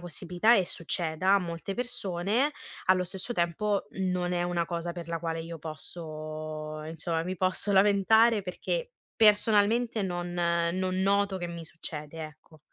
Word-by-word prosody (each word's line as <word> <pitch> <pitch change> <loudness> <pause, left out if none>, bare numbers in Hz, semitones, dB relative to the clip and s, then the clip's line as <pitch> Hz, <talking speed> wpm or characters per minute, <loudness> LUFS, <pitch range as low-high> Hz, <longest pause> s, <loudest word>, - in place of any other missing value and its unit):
possibilità 180 +6 +2
e 190 - +3
succeda 175 +1 +1
a - - +6
molte 170 +2 -5
persone, 235 +2 0 0.3
allo 185 0 +4
stesso 190 +6 -3
tempo, 200 +2 0
non 180 -1 0
è 175 -1 +1
una 175 -1 0
cosa 170 0 -3
per 170 -2 -8
la 165 0 -2
quale 165 0 -3
io 165 0 -7
posso 155 -1 -6
insomma, 165 +1 -2
mi 185 +1 -3
posso 185 +3 0
lamentare, 205 +3 +5
perché - - -3 0.2
personalmente 220 +1 +4
non 175 -1 -3
non 175 +2 0
noto 200 0 +2
che 175 -1 -4
mi 170 -1 -7
succede, 155 0 -6
ecco. 155 0 -14
175 Hz, 145 wpm, -29 LUFS, 165-200 Hz, 0.3 s, a